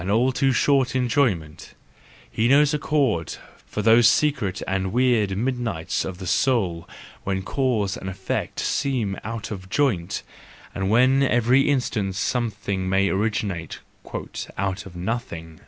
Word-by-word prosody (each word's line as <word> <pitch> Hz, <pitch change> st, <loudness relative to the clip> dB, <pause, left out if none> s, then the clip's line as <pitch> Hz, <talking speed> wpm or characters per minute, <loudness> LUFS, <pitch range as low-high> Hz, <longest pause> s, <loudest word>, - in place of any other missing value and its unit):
all 120 Hz, +5 st, +3 dB
too 135 Hz, +1 st, +2 dB
short 135 Hz, 0 st, +2 dB
enjoyment; 120 Hz, -, 0 dB, 0.6 s
he 110 Hz, -, +1 dB
knows 145 Hz, +3 st, +5 dB
a 150 Hz, -, 0 dB
chord 135 Hz, -, 0 dB, 0.3 s
for 105 Hz, -, -4 dB
those 115 Hz, +1 st, +6 dB
secret 120 Hz, -8 st, +1 dB
and 95 Hz, 0 st, -1 dB
weird 115 Hz, -6 st, +2 dB
midnights 120 Hz, -8 st, -2 dB
of 95 Hz, -2 st, -5 dB
the 95 Hz, -, -7 dB
soul 95 Hz, -8 st, 0 dB, 0.3 s
when 95 Hz, 0 st, -2 dB
cause 110 Hz, -6 st, 0 dB
and 95 Hz, -, -6 dB
effect 95 Hz, 0 st, -3 dB
seem 125 Hz, -8 st, -1 dB
out 115 Hz, 0 st, -5 dB
of 95 Hz, -2 st, -7 dB
joint, 100 Hz, -11 st, 0 dB, 0.5 s
and 95 Hz, 0 st, -2 dB
when 130 Hz, +5 st, +4 dB
every 130 Hz, +1 st, +3 dB
instant 110 Hz, -8 st, 0 dB
something 100 Hz, -4 st, -2 dB
may 95 Hz, +1 st, +2 dB
originate 95 Hz, -5 st, -2 dB, 0.8 s
"out 95 Hz, -1 st, -2 dB
of 90 Hz, -, -13 dB
nothing." 85 Hz, -5 st, -5 dB
110 Hz, 135 wpm, -23 LUFS, 95-130 Hz, 0.8 s, those